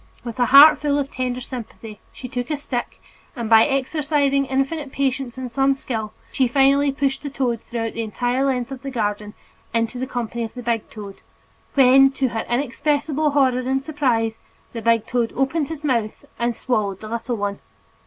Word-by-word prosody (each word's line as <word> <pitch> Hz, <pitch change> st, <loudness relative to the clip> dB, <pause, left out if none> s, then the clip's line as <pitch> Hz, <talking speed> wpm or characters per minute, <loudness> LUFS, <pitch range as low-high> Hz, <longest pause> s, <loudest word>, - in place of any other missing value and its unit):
With 240 Hz, +1 st, -7 dB
a 245 Hz, -, +4 dB
heart 280 Hz, +5 st, +9 dB
full 290 Hz, -1 st, 0 dB
of 280 Hz, -1 st, -2 dB
tender 250 Hz, -1 st, -3 dB
sympathy, 225 Hz, -4 st, -8 dB
she 255 Hz, -, -9 dB
took 245 Hz, -1 st, -4 dB
a 300 Hz, -, -1 dB
stick 250 Hz, -4 st, -5 dB, 0.4 s
and 235 Hz, -3 st, -4 dB
by 225 Hz, 0 st, +6 dB
exercising 280 Hz, 0 st, 0 dB
infinite 270 Hz, +2 st, -2 dB
patience 270 Hz, -2 st, -2 dB
and 255 Hz, -2 st, -5 dB
some 270 Hz, +2 st, +2 dB
skill, 220 Hz, -5 st, -4 dB, 0.2 s
she 260 Hz, -, +2 dB
finally 275 Hz, +2 st, +3 dB
pushed 270 Hz, -1 st, -1 dB
the 285 Hz, -, -5 dB
little 265 Hz, -2 st, -1 dB
toad 230 Hz, -2 st, -3 dB
through 225 Hz, -1 st, -4 dB
the 230 Hz, -, -4 dB
entire 245 Hz, +4 st, -1 dB
length 260 Hz, -2 st, -1 dB
of 265 Hz, -1 st, -7 dB
the 275 Hz, -, -5 dB
garden 210 Hz, -3 st, -3 dB, 0.4 s
into 230 Hz, +2 st, -1 dB
the 260 Hz, -, -3 dB
company 235 Hz, -2 st, -3 dB
of 225 Hz, -, -7 dB
the 245 Hz, -, -7 dB
big 230 Hz, -2 st, -1 dB
toad, 200 Hz, -3 st, -9 dB, 0.6 s
when, 270 Hz, 0 st, +7 dB
to 265 Hz, -1 st, 0 dB
her 225 Hz, -1 st, -3 dB
inexpressible 290 Hz, +4 st, 0 dB
horror 265 Hz, -3 st, +2 dB
and 265 Hz, +2 st, -1 dB
surprise, 245 Hz, -7 st, 0 dB, 0.3 s
the 230 Hz, -, -5 dB
big 230 Hz, -1 st, +2 dB
toad 235 Hz, -2 st, -1 dB
opened 270 Hz, +3 st, 0 dB
his 310 Hz, -1 st, -7 dB
mouth 235 Hz, -7 st, -1 dB
and 235 Hz, 0 st, 0 dB
swallowed 210 Hz, -7 st, -1 dB
the 215 Hz, -, -7 dB
little 235 Hz, +2 st, -3 dB
one. 200 Hz, -1 st, -3 dB
255 Hz, 190 wpm, -22 LUFS, 230-275 Hz, 0.6 s, heart